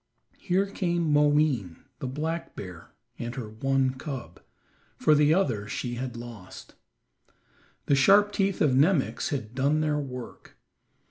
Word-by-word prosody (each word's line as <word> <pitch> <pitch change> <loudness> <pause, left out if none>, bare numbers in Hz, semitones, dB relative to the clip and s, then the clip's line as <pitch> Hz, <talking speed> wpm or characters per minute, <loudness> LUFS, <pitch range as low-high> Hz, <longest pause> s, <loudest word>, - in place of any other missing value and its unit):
Here 190 +1 +1
came 175 -5 -1
Moween, 145 - +2 0.2
the 135 - -4
black 160 +5 -4
bear, 90 -4 -9 0.3
and 120 0 -5
her 125 -4 -5
one 135 +3 +1
cub, 130 - -7 0.6
for 155 - +4
the 150 0 +4
other 125 - +1
she 120 +2 -4
had 125 0 -5
lost. 115 -6 -10 1.1
The - - +2
sharp 200 +9 +5
teeth 195 -1 0
of 145 - +4
Nemox 150 +2 +2
had 120 -6 -4
done 140 +4 +1
their 150 -1 0
work. 125 -4 -8
140 Hz, 135 wpm, -27 LUFS, 120-155 Hz, 1.1 s, sharp